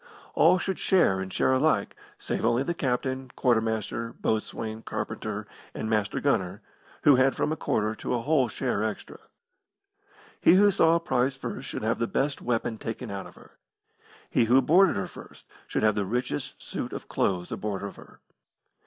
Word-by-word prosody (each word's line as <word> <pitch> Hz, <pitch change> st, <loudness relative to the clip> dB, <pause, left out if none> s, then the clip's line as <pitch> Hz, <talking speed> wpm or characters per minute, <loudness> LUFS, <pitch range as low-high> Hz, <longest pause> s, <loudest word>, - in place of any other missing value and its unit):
All 175 Hz, +3 st, +5 dB
should 190 Hz, +1 st, -3 dB
share 170 Hz, -, +3 dB
and 95 Hz, 0 st, -5 dB
share 130 Hz, -, +2 dB
alike, 130 Hz, -6 st, +1 dB, 0.2 s
save -, -, -3 dB
only 120 Hz, +3 st, +2 dB
the 170 Hz, -, -1 dB
captain, 130 Hz, -2 st, -2 dB
quartermaster, 115 Hz, -1 st, 0 dB
boatswain, 110 Hz, 0 st, -3 dB
carpenter, 105 Hz, -1 st, -4 dB, 0.3 s
and 110 Hz, -, -3 dB
master 105 Hz, -1 st, 0 dB
gunner, 100 Hz, -7 st, 0 dB, 0.4 s
who 145 Hz, -3 st, +7 dB
had 130 Hz, +1 st, +3 dB
from -, -, 0 dB
a -, -, 0 dB
quarter 110 Hz, -7 st, 0 dB
to 110 Hz, -, -3 dB
a 120 Hz, -, -1 dB
whole 145 Hz, -3 st, +3 dB
share 120 Hz, -5 st, -1 dB
extra. 110 Hz, -1 st, -5 dB, 1.2 s
He 175 Hz, -, +6 dB
who 205 Hz, +2 st, +6 dB
saw 165 Hz, -3 st, +4 dB
a -, -, +3 dB
prize 135 Hz, -4 st, 0 dB
first 130 Hz, 0 st, -6 dB
should -, -, -5 dB
have 110 Hz, +2 st, 0 dB
the 115 Hz, -, 0 dB
best 140 Hz, +3 st, -1 dB
weapon 115 Hz, -2 st, -1 dB
taken 115 Hz, 0 st, -5 dB
out 100 Hz, -1 st, -5 dB
of -, -, -16 dB
her. -, -, -19 dB, 0.7 s
He 120 Hz, -, +3 dB
who 125 Hz, +4 st, +5 dB
boarded 185 Hz, +8 st, +5 dB
her 95 Hz, -, -1 dB
first -, -, -13 dB, 0.2 s
should -, -, -1 dB
have 110 Hz, 0 st, +4 dB
the 105 Hz, -1 st, -1 dB
richest 120 Hz, -5 st, -3 dB
suit -, -, -5 dB
of -, -, -7 dB
clothes 90 Hz, -2 st, -1 dB
aboard 100 Hz, -2 st, -3 dB
of 100 Hz, -, -6 dB
her. -, -, -16 dB
120 Hz, 180 wpm, -27 LUFS, 105-135 Hz, 1.2 s, who